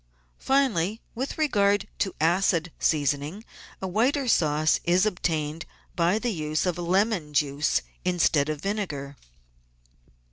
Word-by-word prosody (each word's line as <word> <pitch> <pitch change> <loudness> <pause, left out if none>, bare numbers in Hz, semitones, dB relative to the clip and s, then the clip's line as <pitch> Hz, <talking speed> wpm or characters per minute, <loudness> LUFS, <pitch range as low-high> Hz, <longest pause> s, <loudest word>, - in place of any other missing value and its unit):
Finally, 225 -8 +1
with 260 +4 -4
regard 205 -10 +2
to 190 - -1
acid 170 +1 +2
seasoning, 150 - 0 0.4
a - - -1
whiter 250 +8 +1
sauce 155 -6 +2
is 180 +3 +3
obtained 165 -5 -2 0.3
by 175 +4 +2
the 235 0 -1
use 155 -1 -1
of 175 -1 -1
lemon 180 -3 0
juice 145 0 +1 0.2
instead 170 -5 +2
of 155 -2 -3
vinegar. 165 -9 -3
175 Hz, 115 wpm, -26 LUFS, 155-205 Hz, 0.4 s, is